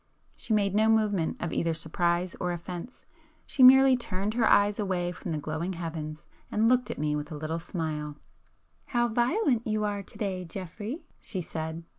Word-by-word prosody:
She - - -7
made 200 -2 +2
no 215 +2 +4
movement 210 -6 +2
of 170 - -3
either 165 -1 0
surprise 170 +2 0
or 180 -1 -1
offence,—she 255 - -7
merely 265 +1 +9
turned 205 -3 -3
her 230 -1 +3
eyes 205 +1 +4
away 180 -3 -1
from 180 0 -6
the 155 - -1
glowing 155 +5 -3
heavens, 155 -3 -6 0.3
and 220 +2 +3
looked 250 +1 +3
at - - -4
me 150 0 0
with 150 +2 -4
a 150 - -5
little 155 +2 -3
smile. 155 -4 -4 0.7
"How 240 -1 +1
violent 240 - +1
you 215 0 0
are 205 -1 -1
to 195 - -13
day, 190 -3 -2
Geoffrey!" 205 - -6 0.2
she 190 - -4
said. 160 -1 -5
185 Hz, 175 wpm, -28 LUFS, 165-220 Hz, 0.7 s, merely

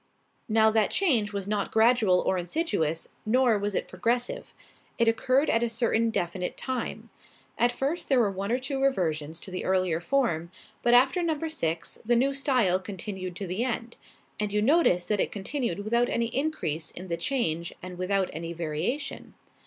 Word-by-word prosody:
Now 220 0 +5
that 215 -2 +2
change 245 - +2
was 200 -2 -4
not 205 -1 -1
gradual 220 -5 +4
or 190 - +1
insidious 175 - -1
nor 240 -1 +3
was 205 0 -2
it - - -1
progressive. 235 +6 -2 0.5
It 235 - +2
occurred 255 +5 +2
at 230 - +2
a 235 - +1
certain 230 -1 +1
definite 180 -3 -2
time. 260 -2 -4 0.5
At 240 +1 +3
first 280 +7 -2
there 265 -3 +4
were 210 -4 +3
one 195 +2 -3
or 245 - +3
two 270 +1 -3
reversions 165 - 0
to 190 - -9
the 185 - -4
earlier 185 -3 +1
form, 175 -8 0 0.3
but 240 0 +4
after 265 +8 +4
number 325 -1 -1
six 165 - -3
the 240 +2 +2
new 270 +4 +2
style 250 -10 +2
continued 190 -1 -6
to 195 - -5
the 185 +6 -2
end; 235 -1 -3 0.4
and 210 -1 -1
you 210 - +1
notice 215 - +3
that 210 -2 0
it - - +1
continued 210 - -3
without 235 +3 +2
any 235 0 -1
increase 250 - -1
in 185 +2 -8
the 170 - -1
change 170 - -1
and 180 -1 -8
without 190 +1 +1
any 165 +1 -5
variation. 170 - -3
215 Hz, 175 wpm, -27 LUFS, 180-250 Hz, 0.5 s, Now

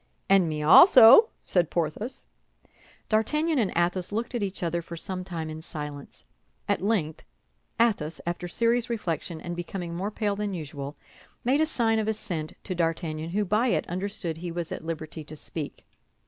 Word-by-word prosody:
"And 195 -4 +4
me 150 -1 -3
also," 255 - +9 0.2
said 175 -3 +2
Porthos. 175 - -3 0.8
D'Artagnan 300 +8 +1
and 210 -5 +1
Athos 175 +2 0
looked 230 +5 -3
at 240 - -2
each 195 -2 -3
other 170 0 -1
for 170 0 -9
some 185 +2 -4
time 170 -3 -5
in 155 0 -7
silence. 150 -3 -8 0.4
At - - 0
length 185 -7 0 0.6
Athos, 200 -9 +1
after 175 +1 -3
serious 235 +5 +1
reflection 170 -7 -3
and 175 +1 -5
becoming 175 0 -5
more 185 +4 -2
pale 210 -1 -1
than 205 -1 -3
usual, 145 -3 -6 0.5
made 270 +5 +2
a 315 - +3
sign 225 -6 +1
of 215 - -1
assent 180 -8 -2
to 185 - -4
D'Artagnan, 165 -2 -2
who 205 +4 0
by 215 +6 +2
it 235 - 0
understood 180 -2 -3
he 175 +1 -5
was 170 +1 -4
at 185 - -5
liberty 160 -1 -5
to 155 +1 -9
speak. 150 0 -6
180 Hz, 170 wpm, -27 LUFS, 160-215 Hz, 0.8 s, also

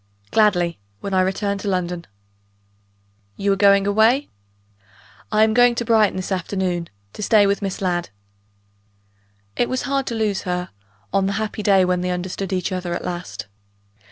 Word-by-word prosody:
"Gladly 180 - +2 0.2
when 200 - -5
I 185 - +4
return 200 +2 -1
to 200 - -5
London." 180 -2 -2 1.3
"You 200 0 +1
are - - +1
going 200 0 +5
away?" 220 +7 +3 1.0
"I 215 0 +4
am 220 0 +3
going 245 +1 +5
to 235 - -2
Brighton 220 -3 +3
this 185 +1 -4
afternoon, 180 -2 -2 0.2
to - - -8
stay 210 0 +4
with 200 +1 +1
Miss 195 0 -4
Ladd." 175 -2 -1 1.5
It 240 - 0
was 255 0 -1
hard 275 -1 -1
to 235 - -2
lose 215 -3 0
her, 180 0 -3 0.4
on 195 -1 +2
the 200 - -1
happy 215 +1 -3
day 195 -3 +4
when 180 0 0
they 180 - -2
understood 180 +2 -3
each 185 0 -1
other 180 -2 -3
at - - -5
last. 175 -7 -5
195 Hz, 165 wpm, -21 LUFS, 180-215 Hz, 1.5 s, going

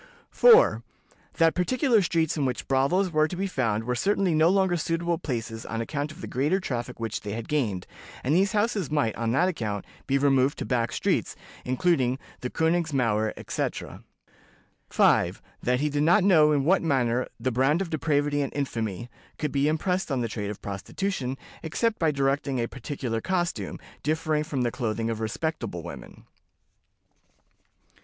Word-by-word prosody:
"4. - - +6 0.5
That 165 -1 +4
particular 240 - +2
streets 165 -3 +1
in 150 - -1
which 130 -2 -2
brothels 170 +8 +2
were 155 -1 +3
to 180 - -6
be 190 +2 -2
found 115 - -1
were 125 +2 -1
certainly 195 +6 +1
no 155 +2 +4
longer 190 -2 +3
suitable 170 0 -1
places 115 -4 -4
on 115 - -4
account 145 +5 -3
of 160 +4 -12
the - - -5
greater 150 +9 +1
traffic 125 -8 -4
which 115 -2 -3
they 100 -1 -5
had 115 0 -5
gained, 110 -12 -1 0.4
and 135 - +1
these 190 +3 +3
houses 205 - 0
might, 145 -8 0
on 115 0 -1
that 175 +7 +3
account, 110 - -3 0.2
be 135 - +2
removed 135 0 +3
to - - -4
back 120 -2 0
streets, - - 0 0.3
including 130 -1 +1 0.2
the 125 - -4
Königsmauer, 135 -11 +1
etc." - - -4 0.9
"5. - - +3 0.2
That 125 +2 +1
he 150 - +1
did 145 0 0
not 175 +6 +4
know 160 -6 +5
in 140 -2 +1
what 185 +4 +4
manner 130 -6 +1
'the 130 - -1
brand 135 +7 +2
of 195 -3 -3
depravity 145 -2 +1
and 140 - -2
infamy' 115 -6 -3 0.3
could 150 -2 -2
be 140 +1 +1
impressed 180 +3 0
on 130 -2 0
the 115 - -1
trade 105 -2 -4
of 105 - -7
prostitution, 130 - -3 0.2
except 220 +8 -1
by 160 - +3
directing 140 -1 0
a 115 - +1
particular 125 -3 -4
costume, 175 -2 -2 0.2
differing 155 0 0
from 135 -4 -2
the 120 - 0
clothing 115 -2 -2
of 110 - -4
respectable 115 - -3
women." - - -10
145 Hz, 170 wpm, -26 LUFS, 120-170 Hz, 0.9 s, 4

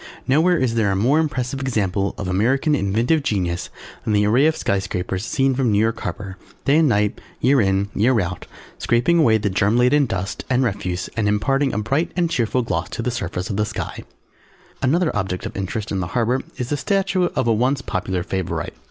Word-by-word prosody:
Nowhere 165 +6 +4
is 125 -3 0
there 110 -3 +1
a - - 0
more 125 +10 +3
impressive 135 -4 -2
example 100 -7 -1
of 100 - -4
American 125 - +1
inventive 120 +6 +1
Genius 90 -9 -2 0.3
than 110 - -1
the 105 0 +3
array 125 +8 +4
of 160 - 0
Sky 100 - 0
Scrapers 95 0 -3
seen 135 +3 +1
from 125 -3 +1
New 100 - +2
York 115 +2 +1
Harbour, 95 -2 -5 0.3
day 140 +2 +4
and 160 -3 +4
night, 105 -2 +1 0.2
year 135 0 +4
in, 95 0 +1
year 120 +3 +3
out, 90 -1 -4 0.3
scraping 120 +9 +2
away 115 -8 +5
the 105 -2 -1
germ 100 +4 +2
laden 130 +3 +4
dust 95 -1 -3
and 130 0 +2
refuse 95 -6 -2
and 110 -2 0
imparting 135 +7 +1
a - - -3
bright 140 +11 0
and 175 -2 0
cheerful 120 0 +1
gloss 90 -5 -2
to 115 - -4
the 125 - -1
surface 95 -5 -4
of 100 - -3
the 105 - +2
sky. - - -5 0.8
Another 160 +4 +1
object 95 -3 -2
of - - -6
interest 100 +2 -4
in 100 - -1
the 90 - -2
harbour 120 +3 +1 0.2
is 125 0 -3
the 145 - 0
statue 190 +2 +1
of - - +1
a 115 - +4
once 130 +4 +1
popular 95 -2 -2
favourite. 95 -1 -3
115 Hz, 205 wpm, -21 LUFS, 100-135 Hz, 0.8 s, away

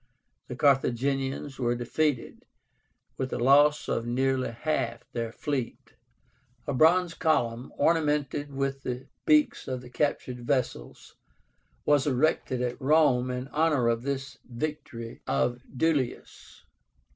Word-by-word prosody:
The 125 - -6
Carthaginians 135 +1 +1
were 120 -1 +1
defeated, 125 +3 -1 0.7
with 130 - -2
the - - -3
loss 145 +4 +4
of 115 - -1
nearly 130 +1 0
half 120 -2 -2
their 115 -1 -3
fleet. 135 -1 -4 0.7
A 145 - -2
bronze 165 +5 +4
column, 125 -8 0
ornamented 150 -3 +1
with 135 0 -2
the 125 0 -4 0.2
beaks 305 -2 +3
of 130 -1 -3
the 125 -1 -13
captured 130 -3 -1
vessels, 125 - -3 0.7
was 145 -1 +3
erected 130 -2 +1
at 125 +3 -3
Rome 135 -3 +3
in 125 +1 -4
honor 150 -6 +2
of 115 0 0
this 135 -1 -4
victory 120 -3 -6
of 120 - 0 0.2
Duilius. 145 -5 -2
135 Hz, 120 wpm, -28 LUFS, 125-150 Hz, 0.7 s, loss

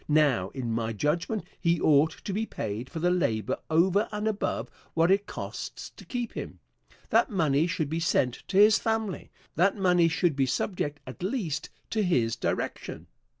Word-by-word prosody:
Now, 145 -11 +3
in 125 -4 -3
my 115 0 -1
judgment, 165 - -1 0.2
he 170 -2 +2
ought 150 +1 +5 0.2
to 200 - -2
be 220 +3 -1
paid 110 +4 -4
for - - -7
the 175 +2 +2
labor 110 - 0
over 185 +6 +3
and 210 0 -2
above 215 -2 -1 0.3
what 165 +2 +4
it 200 +1 +2
costs - - -6
to - - -14
keep 245 -2 -4
him. - - -6 0.5
That - - +4
money 160 - +2
should 165 -3 -1
be 160 +3 -2
sent 130 -7 +1
to 190 - -1
his 210 +1 +7
family. 220 -4 -2 0.3
That 195 +5 +3
money 180 -3 +4
should 170 -2 +1
be 135 -1 +2
subject, 150 0 -2
at 130 - -10
least, 185 - -2 0.2
to 220 - +1
his 125 - +2
direction. - - -3
170 Hz, 175 wpm, -28 LUFS, 140-195 Hz, 0.5 s, his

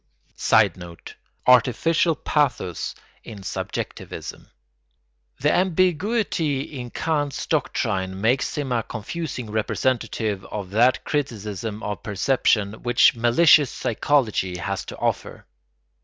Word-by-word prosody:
[Sidenote: 90 -5 +1 0.3
Artificial 135 +7 +4
pathos 130 - -1 0.3
in 105 -3 -10
subjectivism.] - - -6 0.9
The 145 +3 +2
ambiguity 185 - +1
in 130 -4 -7
Kant's 145 0 -2
doctrine 95 - -1
makes 120 +9 +1
him 140 -3 -2
a 120 -2 +1
confusing 125 0 -5
representative 110 -2 -1
of 100 -2 -6
that 120 +5 +3
criticism 110 -6 -3
of 105 0 -4
perception 105 -1 +1
which 120 0 +5
malicious 135 +5 +5
psychology 110 -7 0
has 85 - -3
to - - -8
offer. - - -3
120 Hz, 95 wpm, -23 LUFS, 105-145 Hz, 0.9 s, which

